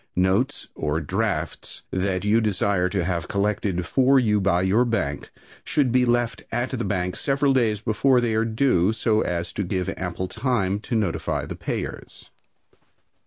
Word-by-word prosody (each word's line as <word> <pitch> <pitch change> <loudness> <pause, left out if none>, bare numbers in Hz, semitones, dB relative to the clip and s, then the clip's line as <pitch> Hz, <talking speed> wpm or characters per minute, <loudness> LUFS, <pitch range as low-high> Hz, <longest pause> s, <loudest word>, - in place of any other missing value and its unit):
Notes 95 +10 +1
or 75 0 -1
drafts 90 0 -3
that 95 0 -1
you 110 +3 +3
desire 100 -3 +1
to 90 -1 -1
have 85 -2 -2
collected 100 -3 -1
for 135 +7 +3
you 105 -4 +2
by 90 -2 +2
your 100 +6 +3
bank 80 - -2 0.3
should 140 -5 +1
be 125 0 +3
left 120 -2 +1
at 120 +2 -1
the 125 -3 -2
bank 90 -2 -1
several 140 0 +1
days 110 -5 +1
before 120 +4 +3
they 120 -2 0
are 110 +1 +2
due, 110 -4 +2
so 110 -1 +1
as 85 0 -2
to 100 - -2
give 90 -1 -2
ample 90 0 -3
time 100 -3 -1
to 115 - -4
notify 105 -6 -1
the - - -6
payers. - - -6
105 Hz, 165 wpm, -24 LUFS, 90-120 Hz, 0.3 s, you